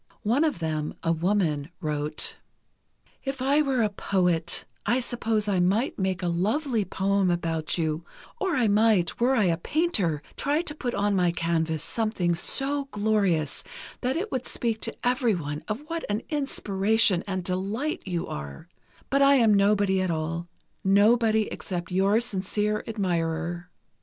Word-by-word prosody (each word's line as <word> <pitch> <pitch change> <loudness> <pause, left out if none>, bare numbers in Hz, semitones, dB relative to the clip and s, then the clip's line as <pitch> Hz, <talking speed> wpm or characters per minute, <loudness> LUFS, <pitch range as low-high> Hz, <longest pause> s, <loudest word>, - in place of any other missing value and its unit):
One 240 +8 +2
of 310 - +1
them, 155 -2 -2
a 165 - +2
woman, 165 -4 0
wrote: 150 -2 -1 0.9
If 270 -1 -3
I 275 +4 +3
were 265 -5 +1
a 215 - +2
poet, 180 -4 0 0.2
I 240 +5 +2
suppose 225 -3 -1
I 195 -3 +1
might 200 +9 +1
make 190 -1 -1
a - - 0
lovely 215 - 0
poem 195 0 +1
about 165 -2 -1
you; 160 -1 -1 0.4
or 380 -6 0
I 245 -4 +3
might, 210 -4 +3
were 250 +3 +3
I 220 - +3
a 170 -3 +2
painter, 195 - 0
try 295 +4 0
to 295 - -3
put 250 -5 -3
on 205 0 +1
my 180 -2 +3
canvas 165 -2 -1
something 215 -5 0
so 275 - +1
glorious 205 - 0 0.4
that 260 +4 0
it 405 +6 -3
would 255 -1 -2
speak 225 -2 -2
to - - -3
everyone 185 - 0
of 215 +5 -3
what 330 +1 -4
an 205 +2 -1
inspiration 215 - +1
and 185 -2 -2
delight 205 - -2
you 175 -3 -2
are; 70 -2 -7 0.4
but 275 +1 +3
I 280 0 +6
am 230 -5 +5
nobody 200 -1 +3
at 185 - 0
all—nobody 195 +7 +1
except 175 -2 -5
your 195 +4 +3
sincere 210 -1 -1
admirer. 175 -4 -2
200 Hz, 150 wpm, -26 LUFS, 170-235 Hz, 0.9 s, I